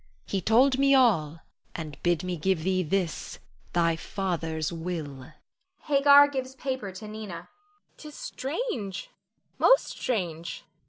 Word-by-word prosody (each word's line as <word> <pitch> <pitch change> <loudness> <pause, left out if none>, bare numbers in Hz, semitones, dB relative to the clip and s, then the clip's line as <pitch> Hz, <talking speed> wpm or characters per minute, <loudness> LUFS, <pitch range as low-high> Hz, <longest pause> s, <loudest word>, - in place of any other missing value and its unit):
He 195 - -2
told 255 +7 +4
me 275 0 +5
all 165 - +3 0.3
and 155 -3 -7
bid 175 -1 +1
me 180 -1 -2
give 170 0 0
thee, 185 +1 +1
this, 180 0 -2 0.4
thy 165 -1 +2
father's 165 -3 -3
will. 160 -6 -5 0.5
[Hagar 285 0 +7
gives 265 -2 -5
paper 260 -6 -4
to 215 +3 -9
Nina.] 215 +1 -8
Nina. 175 -5 -8 0.5
'Tis 300 -2 -11
strange, 260 - -4 0.5
most - - +5
strange. 170 -8 -3
190 Hz, 125 wpm, -27 LUFS, 165-260 Hz, 0.5 s, Hagar